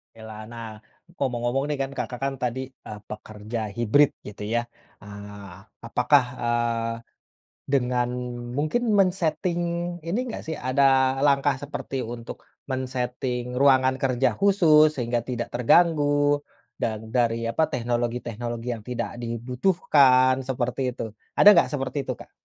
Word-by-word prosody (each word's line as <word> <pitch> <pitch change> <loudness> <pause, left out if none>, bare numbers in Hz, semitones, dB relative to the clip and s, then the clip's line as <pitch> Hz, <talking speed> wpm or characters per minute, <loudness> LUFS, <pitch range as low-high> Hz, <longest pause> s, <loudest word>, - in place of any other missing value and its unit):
Oke - - -17
lah. 110 0 -8
Nah, 115 -1 -7 0.5
ngomong-ngomong 125 +1 0
nih 150 -1 -2
kan 135 - -5
Kakak 125 - -4
kan 135 0 0
tadi, 125 0 -2 0.3
eee, 105 -1 -7
pekerja 110 +1 -6 0.2
hybrid 120 +5 +4 0.2
gitu 105 0 -8
ya. 120 +2 0 0.4
Eee, 100 -1 -10 0.3
apakah, 125 +4 +3 0.2
eee, 115 -1 0 0.7
dengan 125 -3 +1 0.5
mungkin 155 +11 0
men-setting 180 -2 +1 0.5
ini 175 +7 -1
nggak - - -6
sih, 160 - -3
ada 130 0 +3
langkah 140 0 +3
seperti 140 0 -6 0.2
untuk 115 -1 -9 0.3
men-setting 125 -1 -3
ruangan 130 -1 +4
kerja 130 -1 +2
khusus 160 -6 +5
sehingga 120 -2 -1
tidak 120 -2 -3
terganggu, 145 +2 +3 0.4
dan 110 0 -3
dari 115 -1 +1
apa 115 +8 +2
teknologi-teknologi 120 -1 -3
yang 110 -2 -10
tidak 120 -4 -4
dibutuhkan 130 - +3
seperti 125 0 -2
itu. 115 - -5 0.3
Ada - - +7
nggak 170 - +4
seperti 135 -1 -3
itu, - - -1
Kak? - - -14
125 Hz, 130 wpm, -25 LUFS, 120-140 Hz, 0.7 s, Ada